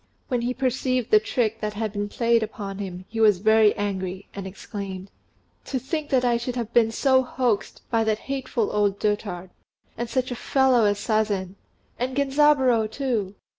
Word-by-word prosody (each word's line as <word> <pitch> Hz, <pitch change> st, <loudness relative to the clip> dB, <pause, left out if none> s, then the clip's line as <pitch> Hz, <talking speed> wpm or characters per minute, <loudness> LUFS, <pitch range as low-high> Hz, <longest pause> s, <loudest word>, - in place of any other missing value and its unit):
When 250 Hz, -3 st, 0 dB
he 245 Hz, +1 st, -2 dB
perceived 255 Hz, -2 st, -1 dB
the 215 Hz, -, +8 dB
trick 225 Hz, 0 st, -1 dB
that 210 Hz, -1 st, -3 dB
had 215 Hz, -1 st, -3 dB
been 205 Hz, 0 st, -3 dB
played 235 Hz, +1 st, +2 dB
upon 205 Hz, -3 st, -5 dB
him, 185 Hz, -2 st, -6 dB
he 225 Hz, -, -6 dB
was 210 Hz, -3 st, +5 dB
very 220 Hz, +2 st, +4 dB
angry, 190 Hz, -2 st, -3 dB
and 195 Hz, -1 st, -6 dB
exclaimed, 195 Hz, -1 st, -7 dB, 0.5 s
"To 265 Hz, -, -2 dB
think 295 Hz, +4 st, -3 dB
that 255 Hz, -2 st, +2 dB
I 240 Hz, -1 st, +3 dB
should 240 Hz, +1 st, -4 dB
have 235 Hz, -2 st, -4 dB
been 230 Hz, -2 st, +4 dB
so 260 Hz, +3 st, +3 dB
hoaxed 245 Hz, -4 st, -2 dB
by 225 Hz, -1 st, +3 dB
that 215 Hz, -1 st, +1 dB
hateful 265 Hz, -4 st, -2 dB
old 205 Hz, -1 st, +1 dB
dotard, 200 Hz, -4 st, -2 dB, 0.4 s
and 235 Hz, 0 st, -4 dB
such 255 Hz, 0 st, -1 dB
a -, -, -2 dB
fellow 260 Hz, -2 st, +3 dB
as 205 Hz, 0 st, +2 dB
Sazen! 205 Hz, -4 st, 0 dB, 0.5 s
And 255 Hz, +2 st, -2 dB
Genzaburô, 270 Hz, -5 st, +3 dB
too! 220 Hz, -6 st, -2 dB
225 Hz, 175 wpm, -24 LUFS, 205-255 Hz, 0.5 s, the